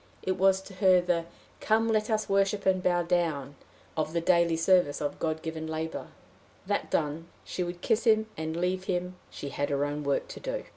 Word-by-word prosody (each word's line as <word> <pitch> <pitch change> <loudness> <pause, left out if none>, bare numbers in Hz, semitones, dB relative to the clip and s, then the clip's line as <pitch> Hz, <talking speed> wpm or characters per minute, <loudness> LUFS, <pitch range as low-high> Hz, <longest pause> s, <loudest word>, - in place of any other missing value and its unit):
It 190 - 0
was 190 +1 +3
to 190 - -12
her 185 -1 +5
the 175 -1 0 0.3
"Come 225 +1 +2
let 215 -1 +1
us 215 -1 0
worship 195 +1 +1
and 190 -1 +3
bow 175 -1 +2
down" 165 -6 0 0.4
of 155 0 -1
the 170 - +2
daily 170 -1 +3
service 165 -4 +3
of 145 -1 -3
God 160 -1 -2
given 160 -1 -4
labor. 160 0 -4 0.6
That - - -1
done, 155 +3 -1 0.2
she - - -4
would 175 0 -6
kiss 230 +1 +1
him, 220 -1 +4
and 160 +1 -4
leave 185 +1 -1
him: 180 -1 -2
she 140 - -7
had 145 +1 -2
her 140 0 +1
own 145 +1 -3
work 140 -1 0
to - - -8
do. - - -4
175 Hz, 200 wpm, -29 LUFS, 160-190 Hz, 0.6 s, her